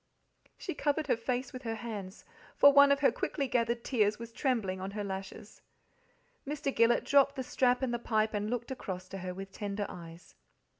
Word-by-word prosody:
She 360 - -5
covered 295 +1 0
her 270 - +2
face 245 +2 -3
with 255 - -7
her 225 -3 -3
hands, 210 -4 -7 0.3
for 285 0 +7
one 280 0 +8
of 280 +1 +2
her 280 - +5
quickly 280 -2 -2
gathered 235 -1 0
tears 210 -5 +1
was 230 0 -8
trembling 225 -8 -1
on 190 - -4
her 205 - -2
lashes. 195 +1 -7 0.9
Mr. 280 -1 -2
Gillet 230 +1 +4
dropped 280 0 +4
the 260 - -3
strap 250 0 +1
and 245 -2 0
the 240 - -1
pipe, 220 -2 0
and 210 0 -1
looked 245 +2 -3
across 185 -7 -5
to 195 - -6
her 180 0 -5
with 195 +1 -8
tender 205 0 -3
eyes. 170 -1 -11
230 Hz, 195 wpm, -31 LUFS, 200-265 Hz, 0.9 s, one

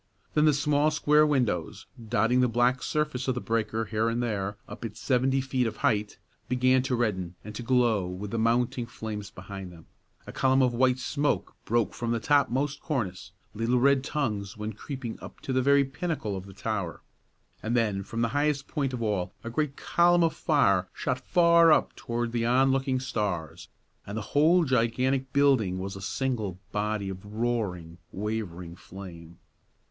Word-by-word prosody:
Then 150 0 +4
the 155 - +5
small 145 +1 +2
square 150 0 +4
windows, 120 - -1 0.2
dotting 115 +2 +3
the 125 - +4
black 120 +2 +2
surface 150 -4 -1
of 130 - +1
the - - -1
breaker 110 -1 -1
here 110 +1 0
and 120 +1 -1
there 100 -3 -2
up - - -9
its 115 -1 -6
seventy 135 +1 +2
feet 130 -2 0
of 110 - -5
height, 105 -1 +1 0.3
began 130 +1 +3
to 130 0 -1
redden 95 -7 -1
and 105 - -7
to 110 - -6
glow 115 -6 +2
with 95 +3 -6
the 115 - -1
mounting 120 +1 +1
flames 105 -3 -6
behind 95 -1 -8
them; 85 -2 -14 0.4
a - - -8
column 130 0 +3
of 125 -1 +2
white 130 +1 +3
smoke 145 +3 -1
broke 115 -1 +1
from 120 - -4
the 115 0 +1
topmost 140 +1 +1
cornice, 95 - -3 0.2
little 115 +3 +1
red 140 +1 +4
tongues 110 -10 -2
went 105 0 -5
creeping 130 -1 -6
up - - -10
to 130 - -3
the 130 - +3
very 140 +1 +5
pinnacle 135 - -3
of 95 0 -7
the 100 - -11
tower, 100 -5 -3 0.6
and 120 +2 0
then 105 -4 +1
from 115 +4 -4
the 115 - +1
highest 145 +1 0
point 140 -4 -2
of 120 -2 -3
all 95 -4 -1
a 115 - -5
great 140 +2 -1
column 175 0 +3
of 165 -2 +2
fire 100 - +2
shot 130 0 -1
far 170 +2 +5
up - - +3
toward 120 0 -3
the 120 -1 -1
onlooking 130 +2 +2
stars, 100 - -3 0.4
and 100 +2 -5
the 110 - -3
whole 165 +5 +5
gigantic 130 +1 +1
building 135 -10 +3
was 95 +1 -5
a 95 - -8
single 110 -3 -2
body 105 -1 -1
of 95 -1 -6
roaring, 105 -6 -3
wavering 95 -5 -4
flame. 85 -3 -11
120 Hz, 180 wpm, -27 LUFS, 105-135 Hz, 0.6 s, the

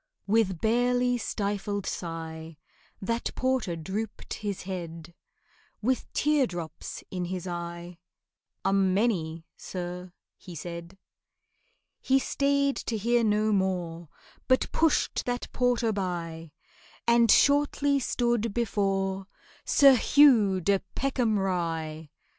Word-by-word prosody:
With 200 -5 +1
barely 245 +2 +2
stifled 205 -2 -2
sigh 160 -2 -6 0.5
That 230 +4 -1
porter 255 -9 0
drooped 195 +7 -5
his 205 -3 -4
head, 170 -3 -7 0.7
With 255 +4 -1
teardrops 190 - -1
in 180 -1 -3
his 180 0 -4
eye, 170 0 -6 0.7
"A 195 - +3
many, 190 -4 +1
sir," 180 0 -6 0.3
he 180 - -10
said. 170 +3 -7 1.0
He 265 0 +3
stayed 280 +1 +1
to 225 - -3
hear 235 +3 +2
no 215 0 +2
more, 175 -4 -1 0.4
But 255 0 +2
pushed 325 -2 +1
that 245 0 -2
porter 245 -2 +1
by, 170 -4 -4 0.6
And 235 -1 +4
shortly 285 +1 +4
stood 235 -4 0
before 195 -4 0 0.4
SIR 275 -2 +7
HUGH 225 -9 +5
DE 200 +2 +2 0.2
PECKHAM 250 -5 +1
RYE. 165 -5 -2
195 Hz, 105 wpm, -28 LUFS, 175-240 Hz, 1.0 s, SIR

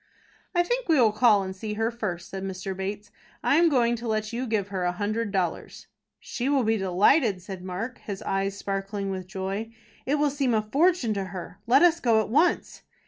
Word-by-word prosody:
"I 350 - +4
think 485 +3 -2
we 315 -4 +5
will 225 -3 +5
call 215 -2 +4
and 190 0 -6
see 210 +2 -5
her 225 +2 0
first," 190 -7 -5
said 195 - -5
Mr. 190 0 -4
Bates. 200 +2 -5 0.3
"I 285 - +3
am 335 0 +5
going 240 -4 +2
to 235 +1 -6
let 215 0 -1
you 250 +2 -2
give 210 -3 -1
her 190 -2 -3
a 180 - +1
hundred 210 +4 -2
dollars." 185 -4 -3 0.3
"She 255 +3 -3
will 280 -3 +3
be 225 0 +2
delighted," 200 - +3
said 185 -1 -8
Mark, 195 +7 -5
his 200 -2 -7
eyes 195 0 -1
sparkling 195 0 -3
with 185 -1 -5
joy. 195 +4 -4 0.3
"It 280 - +2
will 295 -1 +2
seem 270 -4 +1
a 215 - +1
fortune 280 +1 +2
to 195 -2 -2
her. 185 0 -8
Let 265 +7 +5
us 345 -1 +5
go 230 -6 +3
at 220 - -1
once." 310 +9 +1
215 Hz, 210 wpm, -26 LUFS, 195-250 Hz, 0.3 s, we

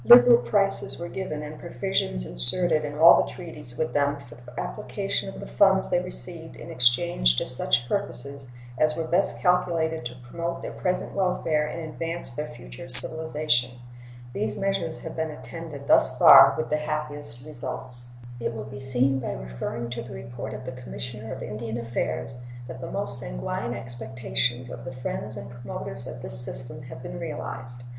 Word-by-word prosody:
Liberal 240 0 +9
prices 200 -2 0
were 170 0 -5
given 155 -6 -5
and 150 0 -8
provisions 170 - -1
inserted 155 - +7
in 145 0 -5
all 165 +2 +8
the - - -4
treaties 150 -8 -8
with 160 - -2
them 145 0 +1
for 130 -4 -14
the 125 +1 -11
application - - -3
of - - -9
the - - -7
funds 65 +1 +3
they - - +2
received - - -4
in - - -10
exchange 120 - +3
to - - 0
such 120 - 0
purposes 140 -8 +3 0.3
as 155 0 +2
were 165 - -2
best 180 +4 +1
calculated 170 -4 +1
to 120 - -11
promote 170 +5 -4
their - - -5
present 180 -1 -2
welfare 165 -5 0
and 170 - -6
advance 165 +1 -3
their 150 +5 -5
future - - -11
civilization. 150 -6 +3 0.6
These 110 -4 -2
measures 195 -5 -2
have - - -7
been 160 0 -2
attended 145 +1 -8
thus 130 - +4
far 135 +1 +9
with 155 -1 -3
the 150 - +2
happiest 150 -4 -5
results. 125 -4 0 0.3
It 115 0 -3
will 110 - -5
be 135 - -9
seen 135 0 +3
by 125 - -4
referring 60 - -5
to 120 -1 -4
the 120 - -9
report 120 +1 -7
of - - -9
the 130 - -5
Commissioner 120 -3 -7
of - - -6
Indian 110 +2 -5
Affairs 120 +1 -3 0.3
that 125 0 -8
the - - -6
most - - -1
sanguine - - -4
expectations 120 +1 -2
of 120 -1 -8
the 130 +1 -7
friends 125 -3 -5
and 120 - -8
promoters 120 0 -7
of 125 - -8
this 115 -1 0
system 120 -1 -8
have 125 0 -10
been 130 - -7
realized. 130 -6 -7
130 Hz, 175 wpm, -25 LUFS, 120-160 Hz, 0.6 s, Liberal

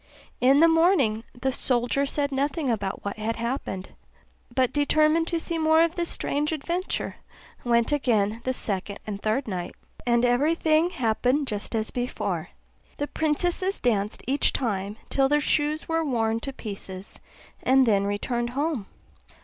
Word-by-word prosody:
In 270 +4 +5
the 335 - +8
morning 325 - +3 0.2
the 265 +2 0
soldier 255 +2 0
said 285 0 -1
nothing 275 0 0
about 200 -4 -3
what 200 - -3
had 220 +1 -2
happened, 235 -5 -3 0.6
but 255 0 +1
determined 310 +3 +3
to 340 -1 0
see 330 0 -1
more 315 +1 +5
of 335 -1 +1
this 340 -1 0
strange 295 +2 -1
adventure, 340 +5 -2 0.5
and 240 - -6
went 235 +1 +3
again 230 -6 +1
the 260 - 0
second 200 -4 -3
and 205 -2 -5
third 230 +5 0
night; 180 -3 -4 0.3
and 240 0 +3
every 275 +7 +3
thing 320 +1 +3
happened 250 +1 +1
just 210 -2 -4
as 220 0 -1
before; 245 0 -3 0.5
the 290 - -1
princesses 350 +6 -1
danced 210 -3 0
each 275 +3 +2
time 205 -4 -2
till 270 -1 +3
their 295 +1 +4
shoes 295 +1 0
were 325 0 +1
worn 225 -5 0
to 275 - -5
pieces, 195 -5 -8 0.4
and 265 0 +4
then 200 -3 +3
returned 235 +4 -1
home. 285 -9 -1
260 Hz, 155 wpm, -26 LUFS, 220-305 Hz, 0.6 s, the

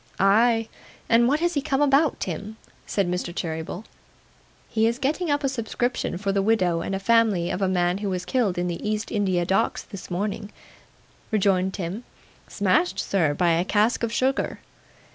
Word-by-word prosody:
'Ay! 225 +3 +4 0.4
And 235 +1 +5
what 295 +5 +1
has 345 0 +1
he 285 - 0
come 275 -2 -1
about, 285 +2 +3
Tim?' 200 +5 -5 0.3
said 200 -3 0
Mr. 180 0 -2
Cheeryble. 160 +4 -4 0.8
'He 220 0 +1
is 235 +1 0
getting 300 +6 -1
up 290 0 +1
a - - +2
subscription 245 -5 -2
for 195 +1 -1
the 195 0 +1
widow 185 -5 +2
and 195 +2 -3
family 205 -4 +2
of 195 - -3
a 190 - +2
man 180 0 +1
who 205 -1 -2
was 180 -1 -3
killed 205 -3 0
in 175 0 0
the 170 -1 -4
East 215 +1 -2
India 190 -5 +1
Docks 190 +2 0
this 200 -4 -10
morning, 205 +3 -3
sir,' - - -23 0.8
rejoined 190 -3 +1
Tim. 190 +5 -4 0.4
'Smashed, 185 -2 +1
sir, 160 -9 +1
by 175 +2 +2
a 165 +1 +2
cask 210 +4 +1
of 230 -1 -1
sugar. 265 +3 0
200 Hz, 180 wpm, -24 LUFS, 180-230 Hz, 0.8 s, And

